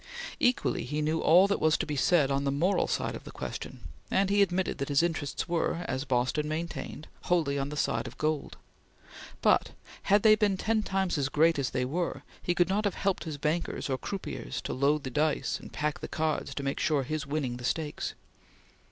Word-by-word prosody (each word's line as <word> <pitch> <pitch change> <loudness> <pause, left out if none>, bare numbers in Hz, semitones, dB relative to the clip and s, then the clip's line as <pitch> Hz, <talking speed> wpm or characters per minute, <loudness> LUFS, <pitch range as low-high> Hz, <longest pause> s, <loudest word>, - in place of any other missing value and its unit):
Equally 250 0 +2
he 150 +4 -3
knew 155 +2 +1
all 175 +5 +6
that 200 0 0
was 155 0 +3
to - - -1
be 150 - -3
said 145 0 +3
on 140 0 +1
the 140 - +1
moral 170 +8 +2
side - - -1
of - - -8
the - - -10
question, - - -6 0.3
and 195 0 +2
he 205 0 +4
admitted 185 -4 +1
that 140 - -2
his 145 +3 +3
interests 160 -4 -2
were, 170 0 -1
as 130 +2 -2
Boston 130 +4 0
maintained, 155 -1 -4 0.2
wholly 155 -6 +1
on 135 +1 -2
the 150 - -6
side - - 0
of - - -10
gold; 155 -1 -1 0.9
but, - - +3 0.3
had 205 +1 +3
they 215 -1 +8
been 210 -3 +2
ten 220 +2 +1
times 190 -5 0
as 135 -1 0
great 160 +1 +3
as 135 - 0
they 130 -1 -1
were, 170 +7 -2 0.2
he 175 - 0
could 175 -1 +3
not 200 +3 +1
have 200 - 0
helped 195 -3 -1
his 155 -3 -4
bankers 150 -1 -1
or 130 - +1
croupiers 155 - -5
to - - -3
load 140 +3 +2
the 130 - -4
dice 150 +3 0
and - - -11
pack 150 0 -2
the - - -5
cards 155 -3 -2
to 140 - -3
make 135 0 -2
sure 150 -4 +2
his 150 +1 -3
winning 140 -4 -2
the 125 - -10
stakes. 150 +3 -2
155 Hz, 215 wpm, -29 LUFS, 140-175 Hz, 0.9 s, they